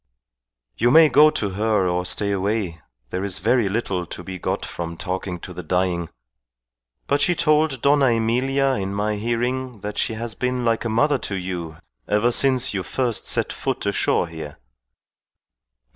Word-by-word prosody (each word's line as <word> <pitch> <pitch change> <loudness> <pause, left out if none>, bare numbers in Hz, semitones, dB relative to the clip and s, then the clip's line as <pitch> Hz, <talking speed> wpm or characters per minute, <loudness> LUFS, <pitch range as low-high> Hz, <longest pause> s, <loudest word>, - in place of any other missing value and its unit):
"You 120 - +3
may 155 +4 +7
go 150 +2 +7
to 105 -9 -2
her 105 -1 +1
or 90 0 -1
stay 100 +3 -1
away. 100 -4 -1 0.3
There 95 - -2
is 95 -2 -2
very 110 +2 +2
little 95 -4 -2
to 90 - -8
be 95 0 -7
got - - -2
from 85 -1 -6
talking 90 -1 -4
to 90 - -8
the 90 - -6
dying. 90 0 -1 1.0
But 145 +1 +1
she 175 - +3
told 155 -5 +2
Dona 140 0 +4
Emilia 130 +4 +2
in 95 0 -3
my 105 +1 -1
hearing 120 +1 -2
that 105 +1 -4
she - - 0
has 115 0 -4
been 125 0 -2
like 115 0 +1
a - - 0
mother 135 +5 +2
to 100 - -4
you 90 -4 -5 0.3
ever 105 +4 +2
since 130 -1 +2
you 95 - -1
first 120 +3 -2
set - - 0
foot - - -3
ashore - - +1
here." 80 -3 -8
105 Hz, 170 wpm, -22 LUFS, 95-125 Hz, 1.0 s, may